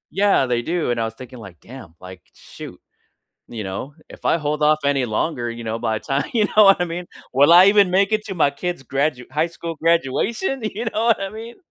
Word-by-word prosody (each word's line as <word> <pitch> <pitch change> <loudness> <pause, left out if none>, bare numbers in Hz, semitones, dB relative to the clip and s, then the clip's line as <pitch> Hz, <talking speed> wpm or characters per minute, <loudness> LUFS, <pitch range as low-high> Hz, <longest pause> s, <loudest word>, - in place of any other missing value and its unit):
yeah, 195 -7 +3
they 120 -2 -1
do. 165 0 -2
And 120 - -2
I 115 - 0
was 110 - -6
thinking 125 0 -11
like, 95 -6 -12
"Damn," 115 -10 -13
like, 90 -1 -12
"Shoot," - - -12 0.7
you 110 -3 -6
know? 100 +9 -6
If - - -15
I - - +3
hold 150 -1 -3
off 150 0 +4
any 140 -2 +1
longer, 120 +2 -2
you 115 0 -8
know, 110 0 -3
by 110 -2 -1
the - - -23
time 135 +1 0
I - - -13
you 220 -3 +2
know 215 +1 +4
what 195 -2 +5
I - - +2
mean? 175 +1 -6 0.3
Will 145 +5 +5
I 175 +2 +9
even 200 -2 +4
make 195 +3 +2
it 215 0 0
to 195 - -5
my 145 -3 +3
kid's 175 +1 -5
gradu 135 -1 -1
high 155 +3 0
school 170 0 -7
graduation? 170 - 0
You 215 +1 -4
know 225 0 -1
what 230 -3 +3
I 195 - -3
mean? 225 +3 -10
150 Hz, 240 wpm, -20 LUFS, 120-195 Hz, 0.7 s, I